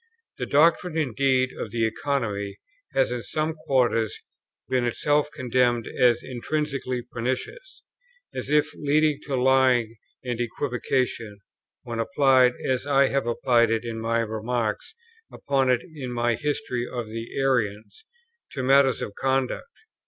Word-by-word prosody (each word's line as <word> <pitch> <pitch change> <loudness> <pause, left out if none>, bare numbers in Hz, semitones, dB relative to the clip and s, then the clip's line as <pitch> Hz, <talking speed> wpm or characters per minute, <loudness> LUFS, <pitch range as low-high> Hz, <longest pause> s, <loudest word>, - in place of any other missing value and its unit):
The - - -3
doctrine 165 +3 +3
indeed 130 -2 +1
of - - -5
the 115 -1 0
Economy 110 -5 -2 0.4
has 135 -2 +2
in 125 -1 -2
some 155 +9 -2
quarters 130 - 0 0.5
been 130 -1 +1
itself 145 +5 +1
condemned 125 -4 +1
as 120 -2 +2
intrinsically 130 -1 -3
pernicious, 130 - -5 0.5
as - - -5
if 150 +1 +2
leading 150 0 +1
to 140 - -2
lying 125 -3 +3 0.3
and 120 -2 -3
equivocation, 120 -3 -2 0.5
when 120 -2 -5
applied, 130 0 +4
as 130 +1 -1
I 140 -1 +4
have 140 -3 -1
applied 120 -1 +3
it 115 +1 0
in 115 -1 -4
my 115 +1 0
remarks 110 - -3 0.4
upon 135 -2 0
it 125 -1 +2
in 150 -8 -7
my 120 0 +1
History 130 -2 -2
of 120 -3 -5
the 115 +1 -6
Arians, 110 - -1 0.5
to 135 - -3
matters 135 0 +4
of 100 - -6
conduct. 135 - -1
125 Hz, 135 wpm, -25 LUFS, 115-140 Hz, 0.5 s, applied